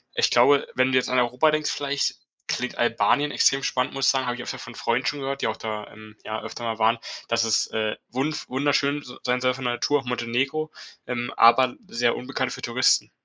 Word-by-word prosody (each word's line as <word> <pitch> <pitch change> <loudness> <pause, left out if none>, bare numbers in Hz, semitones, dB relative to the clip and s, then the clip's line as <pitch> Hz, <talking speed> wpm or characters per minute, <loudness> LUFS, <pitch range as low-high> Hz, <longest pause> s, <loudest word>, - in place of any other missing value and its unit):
Ich - - +3
glaube, 145 -1 +5
wenn 130 +1 +2
du 130 - +5
jetzt 130 - +1
an 125 0 +2
Europa 125 +6 +3
denkst 155 0 0
vielleicht, 140 0 -1 0.3
klingt - - -3
Albanien 145 +3 +2
extrem 135 0 +3
spannend, 125 0 -1
muss 135 0 -1
ich - - +6
sagen, 135 -1 0
habe 120 0 -1
ich 120 - -7
öfter - - -6
von 120 - -10
Freunden 120 +2 -1
schon 145 - -1
gehört, 135 0 -4
die - - +1
auch 110 - -3
da, 110 -1 -5
ähm, 110 0 -14
ja 110 0 -4
öfter 120 - -8
mal 115 -1 -2
waren, 115 +1 +3 0.3
dass 115 0 +1
es, 115 -1 +2
äh, 110 -1 -1
wundv 140 +5 -2
wunderschön 140 +2 +1
s 125 -3 -11
sein 125 0 +1
soll 130 0 +2
von 130 0 -8
der 120 - +1
Natur, 145 +4 +1
auch 135 - -18
Montenegro, 130 +6 -1 0.4
ähm, 120 -1 -3
aber 125 +2 +5
sehr 120 0 +1
unbekannt 130 0 -3
für - - -8
Touristen. 120 +1 +2
125 Hz, 225 wpm, -24 LUFS, 120-135 Hz, 0.4 s, ich